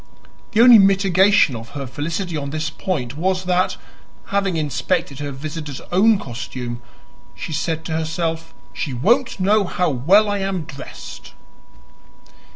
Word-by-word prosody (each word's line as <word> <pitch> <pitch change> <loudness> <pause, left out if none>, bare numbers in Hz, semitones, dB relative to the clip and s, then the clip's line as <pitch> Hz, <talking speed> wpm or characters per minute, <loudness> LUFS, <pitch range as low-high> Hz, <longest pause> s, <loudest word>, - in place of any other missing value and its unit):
The 220 - +4
only 240 -2 +9
mitigation 195 -4 +4
of 115 0 -8
her 140 - -4
felicity 165 +7 -4
on 140 -2 -3
this 155 +1 -3
point 140 - -3
was 185 +2 0
that, 180 0 +1 0.5
having 195 -3 0
inspected 150 -1 -1
her 145 0 -4
visitor's 145 0 -6
own 210 +4 +4
costume, 120 -3 -6 0.5
she 160 - -6
said 160 +2 -2
to - - -5
herself, 160 +1 -2 0.2
"She 135 -5 -4
won't 235 - +1
know 205 +3 +3
how 180 -2 0
well 180 - +4
I 205 -1 -1
am 195 -3 -2
dressed!" 135 - -10
165 Hz, 140 wpm, -20 LUFS, 140-195 Hz, 0.5 s, only